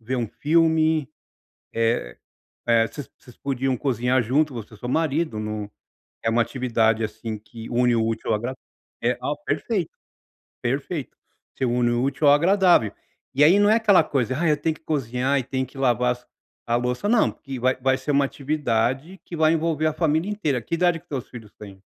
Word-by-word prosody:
ver 125 +3 -3
um 120 -3 -2
filme", 160 0 +2 0.6
eh 115 - 0 0.5
eh, 115 -1 +4
vocês 145 - -9
vocês 125 - -18
podiam 135 -1 -1
cozinhar 125 0 +1
junto, 145 +5 +1
você 115 -2 -8
e - - -10
o - - -16
seu 120 - -5
marido, 155 -5 0
num 105 -1 -4 0.5
é 115 - +1
uma 115 +1 +3
atividade, 115 -3 +1
assim, 110 +1 -5
que 110 +2 -11
une 120 0 +2
o 115 - +2
útil 115 0 -3
ao 110 - +3
agradá 125 +4 -4 0.5
eh, 120 +1 +1
ah, 145 - -1
perfeito, 175 +4 -1 0.7
perfeito, 140 +4 -3 0.4
você 130 - -1
une 120 0 +1
o 120 +1 0
útil 140 +3 0
ao 145 - +8
agradável 175 - +4 0.4
e 140 +2 +4
aí, 185 +6 +6
não 205 0 +5
é 220 - +5
aquela 210 -6 +5
coisa: 130 -4 -1
"Ai, 165 -1 +2
eu 150 - +2
tenho 160 0 -1
que - - -20
cozinhar 135 -2 0
e 130 - -3
tem 130 +1 -2
que 130 - -16
lavar 125 -2 +2
as 125 0 -21 0.4
a 120 - +2
louça", 125 +10 -1
não, 235 -1 +3
porque 135 -2 -8
vai 130 +1 +2
vai 130 0 +2
ser 140 +2 -3
uma 140 0 +3
atividade 135 +3 -1
que 170 - -7
vai 155 0 +4
envolver 160 -1 0
a 155 - 0
família 160 +3 0
inteira. 155 - -1
Que 170 - -3
idade 175 -1 +2
que - - -28
os - - -51
teus 135 -4 -5
filhos 115 -4 -11
têm? 100 -2 -12
130 Hz, 200 wpm, -24 LUFS, 120-155 Hz, 0.7 s, ao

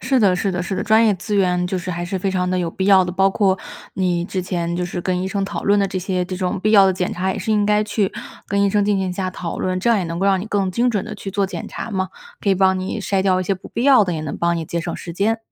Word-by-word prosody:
是 260 +2 +1
的， 195 -4 +4
是 195 - 0
的， 180 0 -2
是 190 +2 -3
的， - - -2
专 220 +1 +4
业 210 - +3
资 205 +3 -4
源 180 -2 +2
就 185 +1 -2
是 180 +1 -5
还 175 0 -3
是 185 +2 -3
非 195 +1 -1
常 180 -1 0
地 185 - 0
有 170 -2 -1
必 190 - -3
要 190 -2 +6
的， 180 - -3
包 195 +1 +3
括 195 -2 +2 0.4
你 175 -2 0
之 185 0 -3
前 170 -2 -2
就 180 - -1
是 175 0 -4
跟 180 0 -1
医 - - -2
生 195 0 -1
讨 195 - -5
论 205 +1 +4
的 200 - +2
这 185 - -3
些 180 0 -1
这 185 0 -5
种 185 0 -2
必 215 +2 +1
要 200 -2 +8
的 190 - +3
检 180 -1 -2
查 190 +1 -1
也 - - -5
是 - - -3
应 210 -1 +3
该 210 0 +3
去 210 -2 -1 0.3
跟 200 0 0
医 200 - +3
生 205 0 +2
进 205 -1 +1
行 190 -1 -1
下 185 0 -2
讨 175 -2 -5
论， 185 0 -1
这 215 - 0
样 230 -3 +4
也 185 - -1
能 165 0 -4
够 195 - +1
让 195 -1 +3
你 - - -5
更 200 -3 0
精 240 +6 +1
准 205 -5 -1
地 - - -7
去 195 - -7
做 200 0 0
检 - - -6
查 - - -6
嘛， 190 -2 -1 0.3
可 200 - +1
以 - - +4
帮 190 0 +3
你 185 +4 -3
筛 195 -1 0
掉 185 -1 +2
一 - - -3
些 195 - 0
不 185 - -12
必 235 - -3
要 265 -6 +6
的， 180 - -2
也 160 - -3
能 155 -2 -5
帮 170 0 +1
你 165 - -3
节 170 +2 -3
省 170 +1 -4
时 170 - -7
间。 215 +5 0
190 Hz, 355 characters per minute, -20 LUFS, 180-200 Hz, 0.4 s, 要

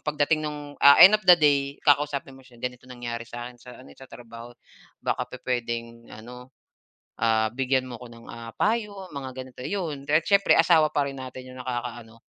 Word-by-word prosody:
pagdating 150 +1 0
nung, 150 -1 -6
ah, 140 0 +8
end 195 - +8
of 215 - +3
the 175 - +10
day, 140 -2 +1
kakausapin 145 -2 +1
mo 135 - -15
siya, 125 -2 -19
"Ganito 125 +1 -7
nangyari 120 -1 -7
sa 120 0 -7
akin 120 -1 -17
sa 125 -1 -13
ano 130 - -15
eh, - - -23
sa 135 - -13
trabaho 120 0 -12 0.5
baka 125 0 -2
pupuwedeng 115 -2 -5
ano, 125 +3 -12 0.7
ah, 110 -1 +1
bigyan 130 +1 0
mo 125 -2 -9
ko 125 - -10
ng, 115 0 -15
ah, 115 0 -9
payo 205 -4 -2
mga 135 -2 -6
ganito." 130 -1 -10
Yun 155 -8 -4
de 150 - +2
at - - -24
siyempre 200 -1 +4
asawa 160 -3 +4
pa 145 - +1
rin 135 -1 -7
natin 130 0 -9
yung 130 - -11
nakakaano 120 -2 -6
130 Hz, 200 wpm, -25 LUFS, 120-145 Hz, 0.7 s, the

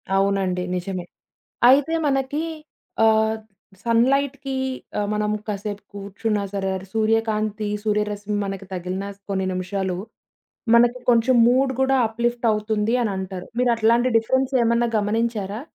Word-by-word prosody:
అవునండి. 195 -2 +1
నిజమే. 180 0 -4 0.7
అయితే 280 +4 +5
మనకి 270 +1 0 0.7
ఆహ్, 220 0 +3 0.5
సన్‌లైట్‌కి 270 +4 +1 0.5
ఆహ్, 205 -1 -1
మనము 210 0 0
కాసేపు 205 0 -4
కూర్చున్నా 205 +1 -2
సరే, 195 -1 -1 0.2
సూర్యకాంతి, 215 -1 0 0.2
సూర్యరశ్మి 210 -1 -1
మనకి 195 0 -5
తగిలినా 185 +2 -4 0.2
కొన్ని 190 -1 -1
నిమిషాలు 185 0 -2 0.8
మనకి 240 +1 +5
కొంచెం 240 +2 +4
మూడ్ 260 +2 +3
కూడా 265 0 +3
అప్‌లిఫ్ట్ 235 +2 -2
అవుతుంది 215 +1 0
అనంటారు. 190 -3 -4
మీరు 250 -1 +3
అట్లాంటి 230 +2 +3
డిఫరెన్స్ 260 +4 +1
ఏమన్నా 235 +1 +2
గమనించారా? 210 -1 -1
215 Hz, 110 wpm, -23 LUFS, 200-235 Hz, 0.8 s, అయితే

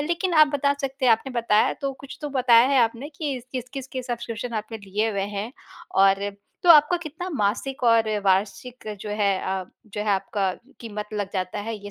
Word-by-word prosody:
लेकिन 345 +1 -1
आप 310 0 +8
बता 280 0 +2
सकते 270 -1 -3
हैं 230 - +7
आपने 255 +4 -1
बताया, 215 -2 +3
तो 275 -1 -4
कुछ 275 - -10
तो 295 - -2
बताया 240 -1 +6
है 275 -2 +3
आपने 235 +4 0
कि, 285 -4 -4
किस-किस 260 +1 -5
के 260 -1 -5
सब्स्क्रिप्शन 240 -1 -5
आपने 220 0 -8
लिए 205 +3 -1
हुए 200 -2 -2 0.2
हैं, 215 +5 -4 0.5
और 195 +1 +4 0.3
तो 355 - +5
आपको 305 +2 +7
कितना 340 +2 -6
मासिक 265 - -1
और 230 -1 +4 0.2
वार्षिक, 210 +6 0
जो 210 - -6
है 205 -1 +1
अ, 190 -1 -2 0.2
जो 210 0 -6
है, 210 - -2
आपका 195 0 0 0.3
कीमत 210 -2 -6
लग 205 -2 -3
जाता 185 +1 -3
है 225 +2 -4
ये 205 0 -10
230 Hz, 195 wpm, -24 LUFS, 205-275 Hz, 0.5 s, आप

